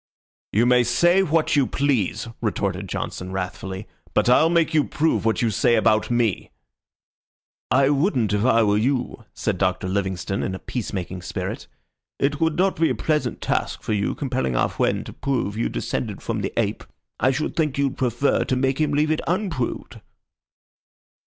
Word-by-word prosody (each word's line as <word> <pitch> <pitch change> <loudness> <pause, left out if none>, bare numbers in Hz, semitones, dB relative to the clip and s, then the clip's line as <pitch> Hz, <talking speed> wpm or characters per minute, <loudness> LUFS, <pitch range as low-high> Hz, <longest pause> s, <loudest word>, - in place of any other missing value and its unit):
"You 110 +4 +3
may 125 0 +5
say 175 +11 +3
what 165 -4 +1
you 140 -3 +3
please," 135 -8 0
retorted - - -2
Johnson, 90 0 -4
wrathfully, 95 +1 -5 0.3
"but - - +3
I'll 155 +6 +5
make 170 -2 +2
you 155 -2 +4
prove 160 -5 0
what 115 +1 +1
you 115 - +2
say 120 +3 +3
about 110 -1 +2
me." 120 -5 0 1.2
"I 135 +1 +4
wouldn't 140 - +1
if 105 0 +1
I 115 -2 +4
were 105 0 +2
you," 125 -1 -1
said 100 -5 -2
Doctor 95 -1 0
Livingstone, 95 0 -2
in 95 - -2
a - - -7
peace 125 -4 -5
making 90 -1 -4
spirit. 85 - -5 0.5
"It 145 +3 0
would 160 -1 +1
not 190 +1 +2
be 165 - +3
a - - 0
pleasant 150 -6 -1
task - - -1
for - - -1
you, 100 -1 0
compelling 130 - -2
our - - +2
friend - - 0
to - - -8
prove 125 -7 -2
you 115 - -1
descended - - -4
from - - -2
the - - -2
ape. - - 0 0.4
I 130 - +3
should 135 +4 -2
think 155 -4 0
you'd 140 -1 0
prefer 125 +2 +1
to 130 - -1
make 135 +3 0
him 150 -1 +1
leave 150 +2 +2
it 155 - 0
unproved." 170 - -2
125 Hz, 180 wpm, -23 LUFS, 105-145 Hz, 1.2 s, may